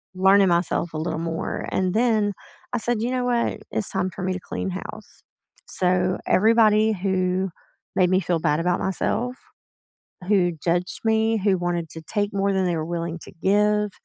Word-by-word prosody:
learning 190 Hz, +1 st, +5 dB
myself 170 Hz, -1 st, 0 dB
a -, -, -3 dB
little 160 Hz, 0 st, -2 dB
more 165 Hz, 0 st, -3 dB
and 185 Hz, -1 st, 0 dB
then, 215 Hz, -2 st, +2 dB, 0.4 s
I -, -, +2 dB
said, 235 Hz, -1 st, -1 dB
"You 235 Hz, -, 0 dB
know 250 Hz, -1 st, -1 dB
what? 240 Hz, -1 st, 0 dB
It's 210 Hz, -, -1 dB
time 185 Hz, -1 st, -1 dB
for 185 Hz, -, -8 dB
me 185 Hz, -, 0 dB
to 185 Hz, -, -4 dB
clean 190 Hz, -, -4 dB
house." 185 Hz, +1 st, -8 dB, 0.4 s
So, 180 Hz, 0 st, +1 dB
everybody 220 Hz, +1 st, +4 dB
who 190 Hz, -1 st, 0 dB, 0.5 s
made 180 Hz, -1 st, +3 dB
me 185 Hz, -, +4 dB
feel 175 Hz, -2 st, 0 dB
bad 150 Hz, -1 st, +1 dB
about 175 Hz, +1 st, +1 dB
myself, 245 Hz, +6 st, -1 dB, 0.9 s
who 185 Hz, -4 st, +3 dB
judged 175 Hz, +1 st, 0 dB
me, 220 Hz, 0 st, +2 dB
who 195 Hz, -2 st, +2 dB
wanted 175 Hz, -2 st, -2 dB
to 160 Hz, -, -9 dB
take 205 Hz, +5 st, -2 dB
more 200 Hz, 0 st, +1 dB
than 190 Hz, -1 st, +1 dB
they 175 Hz, -1 st, 0 dB
were 155 Hz, -, -2 dB
willing 170 Hz, 0 st, -3 dB
to -, -, -13 dB
give, 210 Hz, +1 st, +2 dB
190 Hz, 180 wpm, -23 LUFS, 175-210 Hz, 0.9 s, learning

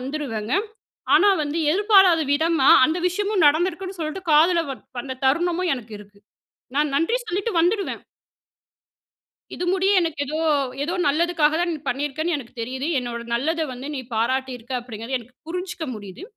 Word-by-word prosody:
வந்துருவேங்க. 255 Hz, -5 st, -3 dB, 0.6 s
ஆனா 410 Hz, -, +6 dB
வந்து 295 Hz, +2 st, -3 dB
எதிர்பாராத 385 Hz, -3 st, +5 dB
விதமா, 315 Hz, -2 st, +2 dB, 0.2 s
அந்த 315 Hz, +4 st, -1 dB
விஷயமும் 400 Hz, +1 st, 0 dB
நடந்திருக்குன்னு 365 Hz, +5 st, +1 dB
சொல்லிட்டு 315 Hz, +4 st, -4 dB
காதில 335 Hz, +3 st, +5 dB
வ -, -, -2 dB, 0.3 s
வந்த 260 Hz, +1 st, -5 dB
தருணமும் 345 Hz, +5 st, +1 dB
எனக்கு 230 Hz, -3 st, -10 dB
இருக்கு. 205 Hz, 0 st, -16 dB, 0.6 s
நான் 295 Hz, -1 st, +1 dB
நன்றி 335 Hz, -, +1 dB
சொல்லிட்டு 405 Hz, +4 st, -2 dB
வந்துடுவேன். 375 Hz, +4 st, 0 dB, 1.6 s
"இது 355 Hz, -, -3 dB
முடிய 385 Hz, +1 st, +2 dB
எனக்கு 330 Hz, -4 st, -2 dB
ஏதோ, 310 Hz, +3 st, -3 dB, 0.4 s
ஏதோ 335 Hz, +4 st, -2 dB
நல்லதுக்காக 315 Hz, 0 st, +2 dB
தான், 350 Hz, 0 st, 0 dB
நீ -, -, -4 dB
பண்ணியிருக்கன்னு 295 Hz, +5 st, -1 dB
எனக்கு 245 Hz, -4 st, -11 dB
தெரியுது. 260 Hz, +5 st, -4 dB
என்னோட 240 Hz, -1 st, -5 dB
நல்லத 320 Hz, +7 st, -1 dB
வந்து 255 Hz, +3 st, -8 dB
நீ 265 Hz, -, -3 dB
பாராட்டி 260 Hz, +4 st, 0 dB
இருக்க 240 Hz, +2 st, -9 dB
அப்படிங்கிறது 240 Hz, +1 st, -5 dB
எனக்கு 245 Hz, +2 st, -17 dB
புரிஞ்சுக்க 360 Hz, 0 st, -4 dB
முடியுது. 200 Hz, -, -10 dB
310 Hz, 145 wpm, -23 LUFS, 260-350 Hz, 1.6 s, ஆனா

